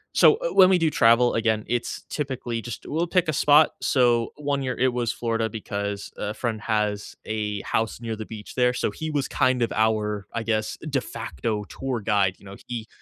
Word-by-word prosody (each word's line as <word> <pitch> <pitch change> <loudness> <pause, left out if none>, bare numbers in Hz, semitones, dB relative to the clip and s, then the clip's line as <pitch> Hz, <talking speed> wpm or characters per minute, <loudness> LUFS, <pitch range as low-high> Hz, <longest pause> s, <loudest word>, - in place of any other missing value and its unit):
so, - - +7
eh, - - -2
when 185 -1 +7
we 185 - +5
do 165 -2 +2
travel, 120 -1 +4
again, 110 -1 +1
it's 120 -1 -2
typically 130 -5 -3
just 120 - -7
we'll 165 +3 -1
pick 180 -1 +2
a 155 - 0
spot, 150 +2 +5
so, 120 -3 +2
one 145 -1 -1
year, 130 -2 -2
it 130 0 +2
was 120 -2 0
Florida 115 -1 -1
because 100 -2 -4
a 105 - -3
friend 110 -3 -3
has 105 -2 -1
a 105 -2 -2
house 110 0 -1
near 115 -1 -3
the 110 0 -6
beach 105 -2 -9
there, 125 -1 +3
so 125 - -1
he 160 +8 -5
was 145 -3 -1
kind 130 -1 +1
of - - -1
our, 105 -2 0
I 115 - -2
guess, 110 -1 -1
de 135 -2 0
facto 110 -4 -4
tour 130 0 -4
guide, 100 -3 +2
you - - -18
know, 100 0 -9
he 115 -3 -5
115 Hz, 205 wpm, -25 LUFS, 110-130 Hz, -, so